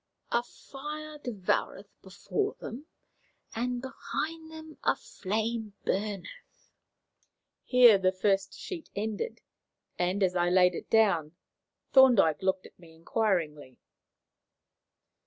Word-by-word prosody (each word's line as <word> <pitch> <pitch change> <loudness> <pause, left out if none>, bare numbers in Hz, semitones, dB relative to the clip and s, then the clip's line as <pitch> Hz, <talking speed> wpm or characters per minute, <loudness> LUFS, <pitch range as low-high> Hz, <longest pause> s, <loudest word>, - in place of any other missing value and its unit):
"'A 235 - +3
fire 300 +4 -8
devoureth 200 -4 -3
before 400 - -3
them, 270 +7 -8 0.7
and 245 +2 -2
behind 320 +4 -5
them 315 -1 -10
a - - +3
flame 215 +1 -3
burneth.'" 205 - -4 0.9
Here 245 -5 +7
the 185 -1 +3
first 195 0 0
sheet 345 -4 -7
ended, 220 - -3 0.6
and, 180 +3 +1
as 185 -1 +1
I 175 0 +2
laid 180 0 +5
it - - -7
down, 195 -9 +3 0.6
Thorndyke 235 - +6
looked 190 0 0
at - - -16
me 165 -2 -16
inquiringly. 160 - -1
210 Hz, 105 wpm, -29 LUFS, 185-260 Hz, 0.9 s, Here